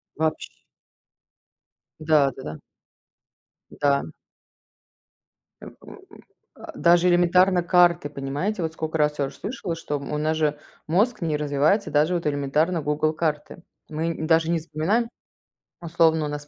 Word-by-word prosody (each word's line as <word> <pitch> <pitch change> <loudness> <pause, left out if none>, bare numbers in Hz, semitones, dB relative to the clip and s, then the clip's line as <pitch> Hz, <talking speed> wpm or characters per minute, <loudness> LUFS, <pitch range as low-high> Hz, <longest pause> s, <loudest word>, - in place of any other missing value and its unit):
Вообщ 160 0 -2 1.5
Да-да-да. 140 - 0 1.1
Да. 140 -1 +1 1.6
Э, - - -10
м, - - -12
м, - - -13 0.6
а. - - -10
Даже 175 +1 +4
элементарно 175 +1 +3
карты, 175 -3 +3
понимаете, 145 +9 -3
вот 160 -1 -3
сколько 160 0 -4
раз 150 -1 0
я 140 - +1
уже - - -8
слышала, 200 -7 -5
что 150 -3 -4
у 145 +2 -5
нас 155 +1 0
же 150 -2 0 0.3
мозг 210 +7 +1
не 155 -3 -1
развивается, 150 +8 +1
даже, 155 +4 +2
вот, 170 - -3
элементарно 150 +4 0
Google 150 +2 0
карты. 155 +2 -3 0.3
Мы 160 +2 -3
нь 160 -1 -4
даже 165 0 +3
не 170 - +1
запоминаем, 190 +10 -1 0.7
условно, 160 -2 +2
у - - -2
нас 145 0 -6
160 Hz, 135 wpm, -24 LUFS, 150-175 Hz, 1.6 s, Даже